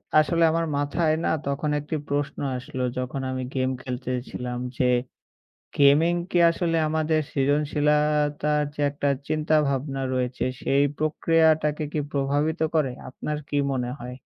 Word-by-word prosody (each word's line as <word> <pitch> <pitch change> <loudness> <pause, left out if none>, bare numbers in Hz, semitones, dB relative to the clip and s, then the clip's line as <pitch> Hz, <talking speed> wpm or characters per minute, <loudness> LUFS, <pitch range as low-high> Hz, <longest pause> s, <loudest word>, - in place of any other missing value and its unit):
আ - - +8
আসলে 165 +2 +2
আমার 165 +1 0
মাথায় 155 +3 +1
না - - +2 0.2
তখন 140 +2 -1
একটি 150 +2 -4
প্রশ্ন 145 0 -2 0.2
আসলো 130 0 -5
যখন 130 +2 -3
আমি 130 0 -3
গেম 130 0 +1
খেলতেছিলাম। 125 -1 -4 0.2
যে 125 - +2 0.9
গেমিং 145 +4 +5 0.2
কি - - +2
আসলে 165 -1 0
আমাদের 155 0 +1
সৃজনশীলাতার 150 +1 +1
যে - - -4
একটা 145 0 -2 0.2
চিন্তা-ভাবনা 145 -3 0
রয়েছে। 125 0 -1 0.2
সেই 140 +1 +2 0.2
প্রক্রিয়াটাকে 155 -1 +2
কি 155 - 0
প্রভাবিত 145 +4 0 0.2
করে 150 -5 +2 0.2
আপনার 150 +3 -4
কী 145 - -1 0.2
মনে 125 -2 -2
হয়? 125 +1 -7
145 Hz, 135 wpm, -25 LUFS, 135-155 Hz, 0.9 s, আ